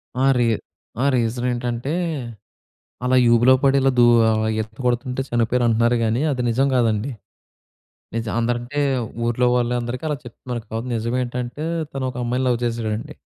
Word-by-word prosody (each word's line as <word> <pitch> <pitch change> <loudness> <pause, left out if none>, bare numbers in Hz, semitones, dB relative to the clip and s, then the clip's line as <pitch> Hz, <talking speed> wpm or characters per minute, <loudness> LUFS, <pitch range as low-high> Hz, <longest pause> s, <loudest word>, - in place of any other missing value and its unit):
ఆ! 130 - +1
రీ 120 - +3 0.6
ఆ! - - +2
రీజనేంటంటే, 120 +2 -1 1.1
అలా 130 +1 +3 0.2
ఊబిలో 120 +3 +6
పడి 140 0 +4
ఇలా 135 0 +3
దూ 120 - +7 0.2
ఆహ్, 110 0 +1
ఈత 110 - -2 0.2
కొడుతుంటే 125 +2 0
చనిపోయారంటున్నారు 120 0 +2
కానీ 115 +4 +1
అది 125 -2 -1
నిజం 135 +4 +2
కాదండి. 115 +1 +1 1.0
నిజం 115 -2 -2
అందరంటే 120 +4 -1 0.5
ఊర్లో 125 +1 +1
వాళ్ళందరికి 120 +3 -1
అలా 150 - -1
చెప్తున్నారు 120 0 -6
కావచ్చు. 115 +2 -4
కానీ 120 - -2
నిజమేంటంటే, 125 +4 -3 0.3
తను 135 -1 -3
ఒక 125 - -8
అమ్మాయిని 125 +2 0
లవ్ 120 -2 +1
చేసాడండి. 115 +5 -3
120 Hz, 140 wpm, -22 LUFS, 115-125 Hz, 1.1 s, దూ